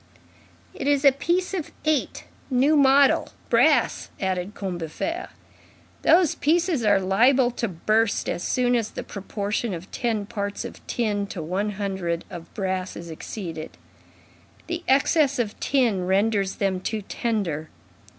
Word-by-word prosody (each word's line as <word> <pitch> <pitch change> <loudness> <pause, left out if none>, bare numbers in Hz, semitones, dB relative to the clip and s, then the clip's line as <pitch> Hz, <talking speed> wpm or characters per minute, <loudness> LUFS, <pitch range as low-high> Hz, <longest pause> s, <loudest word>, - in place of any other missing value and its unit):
"It 275 - -4
is 285 0 +2
a 275 - +9
piece 345 +8 -1
of 350 -6 -3
eight, 310 -3 0 0.3
new 270 +4 +3
model, 275 -1 +5 0.2
brass," - - +3
added 190 +1 -2
Combeferre. 190 - -4 0.7
"Those 335 -1 +5
pieces 330 -3 +1
are 205 -2 +4
liable 240 +7 +3
to 235 -1 -2
burst 215 +5 +1
as - - -2
soon 245 -1 +2
as 230 -3 0
the - - -6
proportion 205 +1 -3
of 175 +3 -10
ten 225 -4 -1
parts 200 0 -4
of - - -9
tin 205 -4 -1
to 175 -5 -6
one 195 +6 -2
hundred 190 -4 -3
of 170 -2 -9
brass 190 -2 -2
is 170 -1 -8
exceeded. 160 -1 -7 0.9
The 345 0 -4
excess 280 +1 +3
of 220 -4 -2
tin 230 -10 +1
renders 195 0 +1
them 195 -2 0
too 215 +3 -3
tender. 190 -9 -2
210 Hz, 140 wpm, -24 LUFS, 190-270 Hz, 0.9 s, a